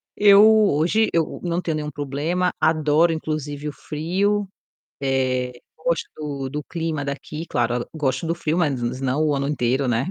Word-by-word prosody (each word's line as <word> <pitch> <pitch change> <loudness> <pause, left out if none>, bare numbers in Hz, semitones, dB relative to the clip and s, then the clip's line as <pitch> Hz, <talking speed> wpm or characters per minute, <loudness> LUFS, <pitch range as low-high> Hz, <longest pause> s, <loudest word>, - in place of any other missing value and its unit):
Eu 205 0 +7 0.2
hoje, 175 +10 +2
eu 165 -2 -1
não 175 0 -1
tenho 165 -3 -2
nenhum 150 -1 -3
problema, 145 +6 -1
adoro 155 +1 +3
inclusive 150 -2 -4
o 145 - -4
frio, 195 +8 -1 0.5
eh, 130 -2 0 0.3
gosto 165 +1 -1
do 140 -3 -4
do 150 +1 -4
clima 160 -4 -3
daqui, 150 +3 -5
claro 120 +1 0
a - - -14
gosto 150 +1 -1
do 165 - 0
frio, 165 -1 -1
mas 145 -8 +1 0.2
não 135 +3 0
o 145 - +2
ano 140 0 -1
inteiro, 130 -1 0
né. 120 +7 0
150 Hz, 165 wpm, -22 LUFS, 140-170 Hz, 0.5 s, Eu